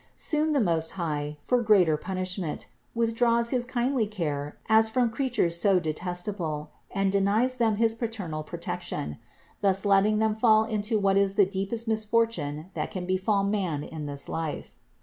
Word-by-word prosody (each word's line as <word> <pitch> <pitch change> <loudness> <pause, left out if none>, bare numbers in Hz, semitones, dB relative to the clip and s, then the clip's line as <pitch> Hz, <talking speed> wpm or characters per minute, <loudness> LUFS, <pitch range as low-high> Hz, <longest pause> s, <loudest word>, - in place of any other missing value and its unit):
Soon 310 0 +1
the 290 - +2
Most 165 -7 +1
High, 150 -3 -3
for 250 +7 +1
greater 195 -8 +4
punishment, 185 0 -3 0.3
withdraws 235 0 +2
his 250 -2 +1
kindly 245 -2 0
care 150 -8 -4
as 220 0 +5
from 240 0 +1
creatures 230 -10 0
so 195 -3 +4
detestable 175 -1 -3 0.2
and 195 -1 0
denies 210 +6 +2
them 225 -3 +2
his 225 +1 +3
paternal 220 -9 -4
protection, 75 - -5 0.4
thus 195 0 +2
letting 200 +2 +4
them 220 0 +1
fall 220 -1 +4
into 220 0 -1
what 195 -1 +2
is 200 0 +2
the 200 - +5
deepest 195 +4 -3
misfortune 215 -8 0
that - - -3
can 185 -2 -5
befall 190 +2 +1
man 190 -8 -1
in 155 -2 -6
this 140 -1 -6
life. 160 -2 -4
200 Hz, 155 wpm, -27 LUFS, 170-225 Hz, 0.4 s, as